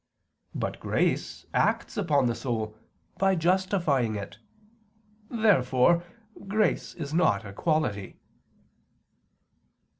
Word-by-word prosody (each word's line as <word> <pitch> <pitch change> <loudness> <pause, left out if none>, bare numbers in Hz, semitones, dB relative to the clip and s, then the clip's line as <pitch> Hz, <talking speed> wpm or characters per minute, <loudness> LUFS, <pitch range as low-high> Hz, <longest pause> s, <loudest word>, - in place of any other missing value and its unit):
But - - -3
grace - - -1
acts - - +1
upon 150 -9 +2
the 120 - +1
soul, 110 -4 -3 0.4
by 195 0 +3
justifying 170 - +1
it. 100 -1 -7 0.9
Therefore 170 - +3 0.4
grace 215 +2 0
is 150 -3 -6
not 110 - +2
a 100 - -8
quality. 130 - -1
155 Hz, 90 wpm, -27 LUFS, 115-185 Hz, 0.9 s, by